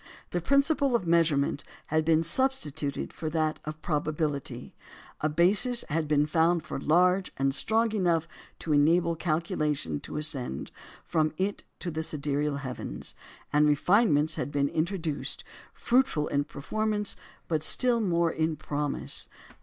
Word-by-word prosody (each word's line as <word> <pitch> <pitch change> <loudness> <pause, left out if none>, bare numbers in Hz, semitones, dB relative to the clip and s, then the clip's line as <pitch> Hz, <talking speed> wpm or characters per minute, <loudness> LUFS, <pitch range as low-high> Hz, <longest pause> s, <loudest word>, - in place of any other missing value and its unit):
The 175 - -1
principle 280 - +2
of 215 -6 0
measurement 160 -4 +2 0.3
had 155 0 +3
been 160 0 +3
substituted 155 - -1
for 155 - -4
that 155 -1 0
of 155 +1 -7
probability; 150 -2 -2 0.5
a 155 - 0
basis 205 - +4
had 160 0 -1
been 145 0 +3
found 165 +2 +2 0.2
large 180 +4 +3
and 135 0 +1
strong 225 +8 +1
enough 170 -6 +1 0.3
to 155 - -1
enable 165 +3 +3
calculation 155 - -1
to - - -6
ascend 135 - -3 0.3
from 155 -1 0
it 195 +2 -2 0.2
to 175 - -3
the 160 0 -3
sidereal 145 -1 -1
heavens; 125 - -6 0.4
and 150 +1 +5
refinements 155 0 +3
had - - -3
been 140 -1 +1
introduced, 165 -2 -2 0.3
fruitful 240 - +1
in 145 0 0
performance, 210 +8 -2 0.3
but 160 -3 0
still 240 +8 +3
more 170 -4 +1
in 160 0 -1
promise. 145 -1 -2
160 Hz, 135 wpm, -28 LUFS, 150-180 Hz, 0.5 s, and